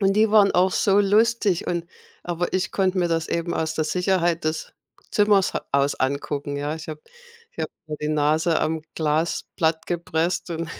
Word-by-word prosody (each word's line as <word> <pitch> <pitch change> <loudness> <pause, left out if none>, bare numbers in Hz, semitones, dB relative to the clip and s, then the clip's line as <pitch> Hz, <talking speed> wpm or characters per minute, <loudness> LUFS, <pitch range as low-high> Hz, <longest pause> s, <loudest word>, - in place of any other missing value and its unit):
und 195 0 +3
die 215 0 +3
waren 205 -2 +6
auch 185 +1 +3
so 195 +2 +3
lustig 205 -2 +2
und 170 -1 -2 0.4
aber 175 0 -2
ich 185 0 -1
konnte 190 -1 +1
mir 175 - +2
das 165 -1 -1
eben 170 0 -2
aus 160 0 -1
der 155 - 0
Sicherheit 175 -1 +1
des 155 +1 -3 0.4
Zimmers 205 -2 +3 0.2
aus 140 0 +2
angucken. 140 +1 -2
Ja, 145 +2 -2
ich 160 0 -9
habe 155 -1 -6 0.5
ich - - -32
habe - - -3 0.2
mir 155 -1 -5
die 150 - -2
Nase 155 +2 +2
am 155 0 -1
Glas 155 +1 0
platt 160 -1 0
gepresst 170 +1 -1
und 165 -1 -4
170 Hz, 185 wpm, -23 LUFS, 155-190 Hz, 0.5 s, waren